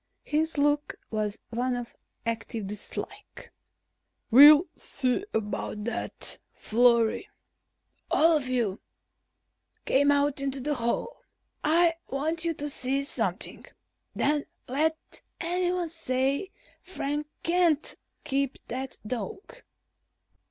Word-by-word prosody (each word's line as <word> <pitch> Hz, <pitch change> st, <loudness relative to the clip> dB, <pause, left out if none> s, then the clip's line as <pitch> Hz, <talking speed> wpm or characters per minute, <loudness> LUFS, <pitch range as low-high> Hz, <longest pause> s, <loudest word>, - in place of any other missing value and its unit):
His 315 Hz, +1 st, 0 dB
look 290 Hz, 0 st, +1 dB, 0.2 s
was 210 Hz, -2 st, -1 dB
one 245 Hz, +2 st, 0 dB
of 245 Hz, -1 st, -6 dB, 0.3 s
active 230 Hz, -1 st, -3 dB
dislike. 205 Hz, +1 st, -7 dB, 0.8 s
"We'll 295 Hz, +6 st, +10 dB
see 255 Hz, +7 st, 0 dB
about 210 Hz, -1 st, -3 dB
that, 235 Hz, -, -1 dB
Florry. 235 Hz, -, +3 dB, 0.8 s
All 325 Hz, +1 st, +5 dB
of 285 Hz, -4 st, 0 dB
you, 235 Hz, -6 st, -1 dB, 1.0 s
come 285 Hz, +2 st, +3 dB
out 285 Hz, -1 st, +2 dB
into 275 Hz, 0 st, -2 dB
the 295 Hz, +3 st, -1 dB
hall. 235 Hz, -, -2 dB, 0.4 s
I 335 Hz, +2 st, +4 dB, 0.2 s
want 315 Hz, +5 st, -1 dB
you 335 Hz, -1 st, 0 dB
to 290 Hz, -, -4 dB
see 275 Hz, -1 st, -1 dB
something. 280 Hz, -, -2 dB, 0.5 s
Then 295 Hz, 0 st, +1 dB, 0.2 s
let 315 Hz, +5 st, -1 dB, 0.2 s
anyone 355 Hz, 0 st, 0 dB
say 275 Hz, +2 st, -1 dB, 0.3 s
Frank 295 Hz, -5 st, -3 dB, 0.2 s
can't 335 Hz, -3 st, +2 dB, 0.3 s
keep 275 Hz, -1 st, -1 dB
that 260 Hz, +2 st, -4 dB
dog!" 385 Hz, -, -5 dB
280 Hz, 100 wpm, -28 LUFS, 245-315 Hz, 1.0 s, We'll